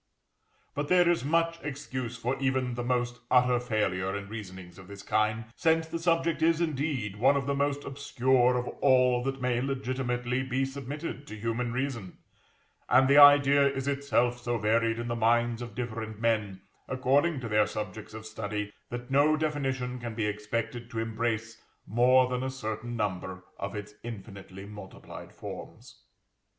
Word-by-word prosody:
But 145 0 -2
there 180 +1 +5
is 170 -4 +2
much 165 +3 +1
excuse 130 -4 -5
for 125 +4 -1
even 130 -2 0
the 120 0 -3
most 120 0 -1
utter 125 -1 +4
failure 100 -5 -1
in 100 0 -6
reasonings 95 -5 -9
of 95 - -12
this 100 0 -10
kind, 110 +1 +1
since 160 -1 +2
the 165 - -4
subject 165 -1 +1
is, 165 0 +3
indeed, 140 - -1
one 135 +6 +4
of 135 - -2
the 140 - 0
most 140 0 0
obscure 130 -2 +2
of 125 - -2
all 125 -2 +4
that 135 +1 -3
may 125 -1 +1
legitimately 130 -2 -1
be 130 +1 0
submitted 140 +2 -6
to 110 - -7
human 115 +2 -2
reason; 125 -7 -3 0.7
and 130 0 +6
the 140 +2 +7
idea 140 -1 +8
is 135 -1 -2
itself 140 -4 +1
so 120 0 -1
varied 115 +1 +2
in 120 0 -4
the 120 - -1
minds 120 +1 +2
of 120 -4 -7
different 110 -3 -5
men, 105 -4 0 0.3
according 140 +4 +2
to 125 - -5
their 105 -1 +3
subjects 105 0 -6
of 110 0 -8
study, 105 -1 -4 0.2
that 120 +1 -6
no 145 +3 +4
definition 135 -5 -2
can 120 -2 -6
be 110 -2 -1
expected 110 +3 -3
to 115 - -7
embrace 110 0 -2 0.2
more 125 +4 +4
than 125 0 -2
a 130 - -2
certain 120 -2 -5
number 95 -3 -3 0.2
of 100 - -4
its 105 0 -6
infinitely 100 -4 -9
multiplied 105 -2 -10
forms. - - -10
125 Hz, 165 wpm, -29 LUFS, 110-135 Hz, 0.7 s, idea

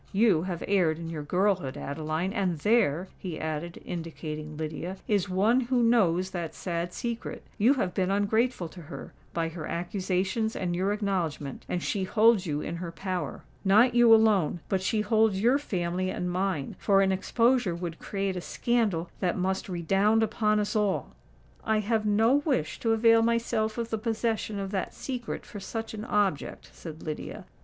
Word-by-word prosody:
You 200 -5 +4
have 175 -1 -4
erred 180 -6 +2
in 165 0 -6
your 155 -2 -4
girlhood, 180 -2 0
Adeline! 155 +6 -3
and 190 -6 0
there," 190 -2 +2
he 175 -5 -5
added, 160 +2 -4
indicating 155 -3 -6
Lydia, 160 +4 -4
"is 200 -3 +1
one 205 +7 +3
who 245 0 +1
knows 190 -6 +3
that 170 -3 -4
sad 170 -1 -3
secret. 235 +4 -5 0.2
You 240 +7 +5
have 185 -9 -1
been 185 -1 0
ungrateful 205 0 +1
to 180 - -11
her—by 165 +1 -6
her 165 -1 -6
accusations 190 +5 -1
and 175 -2 -2
your 190 +3 +1
acknowledgment; 180 -9 -2
and 175 - -2
she 195 - -1
holds 215 -1 +4
you 150 -1 -1
in 170 - -4
her 170 -1 -5
power. 185 +1 -4 0.2
Not 215 +6 +5
you 240 -1 +6
alone:—but 195 -4 +3
she 210 +3 +1
holds 215 -2 +2
your 245 +7 +4
family 185 -7 -2
and 180 -1 -2
mine—for 195 +2 +1
an 190 - +2
exposure 230 +1 +2
would 170 -1 -5
create 195 -1 -2
a 180 - -3
scandal 205 -7 0
that 180 -3 0
must 190 +1 -1
redound 195 +6 +2
upon 215 -1 +1
us 210 +2 -2
all!" 210 -3 0 0.5
"I 220 0 +2
have 215 0 0
no 225 +6 +4
wish 285 - -1
to 225 -1 +2
avail 225 0 +5
myself 230 -1 0
of 230 -1 -3
the 220 - -1
possession 220 -1 -1
of 195 -1 -4
that 190 -3 -3
secret 250 -3 -5
for 205 - -8
such 225 +3 -5
an 215 0 -6
object," 200 -10 -1
said 160 -2 -9
Lydia. 155 -1 -6
195 Hz, 170 wpm, -28 LUFS, 170-220 Hz, 0.5 s, you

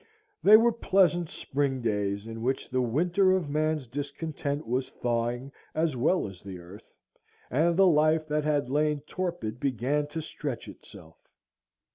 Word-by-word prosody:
They 215 +2 +9
were 235 +2 +4
pleasant 185 -6 +2
spring 135 -1 -2
days, 100 -2 -1
in 115 0 -7
which 130 +3 -2
the 130 0 +1
winter 175 - +2
of 175 -6 -1
man's 155 -1 0
discontent 145 +2 -4
was 125 +3 -1
thawing 120 +2 -2 0.2
as 160 -3 +1
well 145 - +1
as 95 -2 -11
the 95 -2 -8
earth, 90 +4 -13 0.6
and 165 +6 +2
the 195 - +6
life 155 -1 +3
that 150 0 0
had 145 -3 +1
lain 150 +2 +1
torpid 150 - -4
began 140 +2 0
to 150 +2 -5
stretch 145 -5 -5
itself. 80 -6 -14
145 Hz, 150 wpm, -28 LUFS, 120-160 Hz, 0.6 s, They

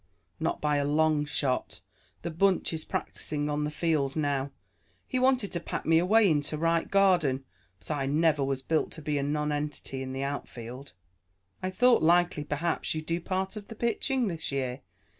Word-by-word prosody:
"Not - - -1
by 150 -1 +1
a 145 - +1
long 150 +1 +2
shot. 135 -3 -1 0.4
The 170 - -3
bunch 185 +2 +2
is 160 -1 -2
practicing 150 -1 -2
on 150 0 0
the - - -1
field 150 -3 0
now. 140 -3 0 0.6
He 255 - -1
wanted 255 -5 +2
to 170 - 0
pack - - -5
me 165 0 +5
away 210 +5 +5
into 150 -2 +1
right 165 +1 +1
garden, 175 -10 +3 0.3
but 80 - -8
I 140 -2 -1
never 150 0 +2
was 135 -1 -1
built 160 +2 +1
to 160 - -8
be 145 -1 0
a - - 0
nonentity 150 -1 -2
in 130 0 -5
the 135 +1 -3
outfield." 135 -2 -6 0.7
"I 185 - -1
thought 245 +6 +4
likely 175 -2 +3
perhaps 155 +3 -1
you'd 155 0 -4
do 165 +2 -1
part 190 +3 -2
of 210 -1 -8
the 225 - -9
pitching 235 +2 0
this 165 -5 -3
year. 130 -2 -2
155 Hz, 180 wpm, -29 LUFS, 145-175 Hz, 0.7 s, me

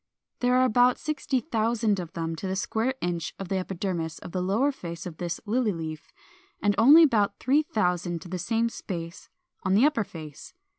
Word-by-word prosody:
There 250 0 +2
are 255 0 +5
about 245 +1 +4
60,000 235 - 0
of 175 -3 -7
them 165 0 -3
to 190 - -4
the 190 - -2
square 225 +7 -1
inch 175 -2 -3
of 195 -2 -7
the 195 - 0
epidermis 180 -3 -3
of - - -9
the 185 - -2
lower 215 +10 +2
face 170 -10 -7
of 170 -3 -7
this 175 -1 -3
Lily 225 +1 +1
leaf, 160 -2 -7 0.5
and 205 0 +2
only 290 +9 +9
about 210 -8 +2
3000 180 - +1
to - - -10
the 180 +1 -4
same 230 +4 +1
space 170 -6 -7 0.3
on 190 0 +1
the 230 +7 +5
upper 295 -7 +2
face. 160 -6 -10
200 Hz, 185 wpm, -27 LUFS, 175-245 Hz, 0.5 s, only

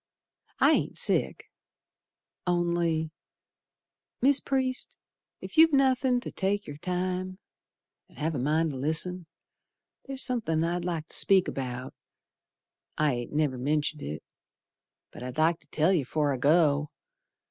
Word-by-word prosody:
I - - +5
ain't - - 0
sick, - - 0 1.0
only 170 -2 0 1.1
Mis' 275 +2 +4
Priest, 260 -1 -2 0.5
ef - - -2
you've 320 -1 +7
nothin' 260 -2 +3
ter 245 - -7
take 200 +1 -1
yer 145 - -8
time, 185 +2 -3 0.7
An' - - -22
have 160 +2 -2
a 140 - -3
mind 155 +4 +1
to 135 - -6
listen, 160 +5 0 0.8
Ther's 270 -1 -1
somethin' 205 -11 0
I'd 175 +1 -2
like 165 -3 -3
ter - - -9
speak 190 -2 +5
about 125 -1 -5 1.0
I 150 -2 +2
ain't 120 -1 -5
never 145 -4 0
mentioned 150 +2 -1
it, 75 +1 -6 0.9
But - - -12
I'd 125 +2 -7
like 165 +2 +2
to 155 - -21
tell 160 +5 +2
yer 165 -6 +1
'fore 145 +2 0
I - - -3
go. 150 +1 +3
165 Hz, 135 wpm, -28 LUFS, 150-185 Hz, 1.1 s, you've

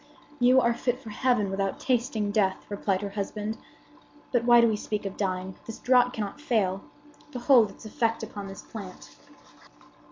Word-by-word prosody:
"You 250 +1 +6
are 235 -2 +3
fit 245 +1 -1
for 225 -5 -10
heaven 225 -4 +1
without 195 0 -2
tasting 235 -5 0
death!" 195 -3 +1
replied 200 -1 -1
her 200 - -4
husband 210 +2 -4 0.7
"But 240 -2 +1
why 240 0 +7
do 235 - +6
we 220 - +1
speak 210 0 -4
of 195 - -4
dying? 185 -1 -2
The 225 - -5
draught 250 -1 +4
cannot 210 +6 -5
fail. 200 -9 0 0.5
Behold 245 -4 +4
its 200 - -14
effect 225 +1 -1
upon 205 -2 -6
this 195 0 -9
plant." 195 -5 -10
215 Hz, 165 wpm, -27 LUFS, 200-245 Hz, 0.7 s, why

